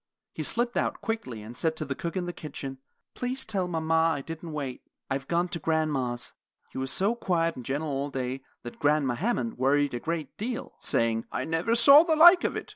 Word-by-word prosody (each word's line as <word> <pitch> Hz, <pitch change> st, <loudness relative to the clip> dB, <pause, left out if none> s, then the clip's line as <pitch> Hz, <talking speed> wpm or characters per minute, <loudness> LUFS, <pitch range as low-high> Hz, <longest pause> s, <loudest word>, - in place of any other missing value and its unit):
He -, -, -5 dB
slipped 240 Hz, 0 st, 0 dB
out -, -, 0 dB
quickly, 130 Hz, -, -4 dB
and 115 Hz, +3 st, -9 dB
said 160 Hz, +4 st, 0 dB
to 155 Hz, -, -3 dB
the 140 Hz, -, -2 dB
cook 170 Hz, +6 st, -4 dB
in 180 Hz, -, -1 dB
the 175 Hz, -, -4 dB
kitchen, 135 Hz, -4 st, -7 dB, 0.3 s
"Please 255 Hz, +2 st, -3 dB
tell 195 Hz, -4 st, -1 dB
mama 165 Hz, -2 st, -1 dB, 0.2 s
I 140 Hz, -, -4 dB
didn't 165 Hz, +2 st, -7 dB
wait; 140 Hz, -4 st, -4 dB, 0.3 s
I've 135 Hz, 0 st, -2 dB
gone 175 Hz, +1 st, +1 dB
to 170 Hz, -, -3 dB
grandma's." 145 Hz, -6 st, -1 dB, 0.4 s
He -, -, -5 dB
was 130 Hz, 0 st, -2 dB
so 195 Hz, -, +1 dB
quiet 170 Hz, -7 st, 0 dB
and 125 Hz, -, -8 dB
gentle 145 Hz, +5 st, -2 dB
all 140 Hz, +1 st, -2 dB
day 130 Hz, -1 st, -3 dB, 0.2 s
that 120 Hz, -, -9 dB
Grandma 145 Hz, -4 st, +2 dB
Hammond 230 Hz, -, -2 dB
worried 140 Hz, +1 st, +2 dB
a 120 Hz, -, -2 dB
great 160 Hz, -1 st, -4 dB
deal, 230 Hz, +3 st, -4 dB
saying: 115 Hz, -1 st, 0 dB
"I -, -, -2 dB
never 165 Hz, +8 st, +1 dB
saw 275 Hz, +5 st, +9 dB
the 325 Hz, -1 st, +2 dB
like 345 Hz, +3 st, +8 dB
of -, -, 0 dB
it. -, -, -5 dB
160 Hz, 210 wpm, -28 LUFS, 135-190 Hz, 0.4 s, saw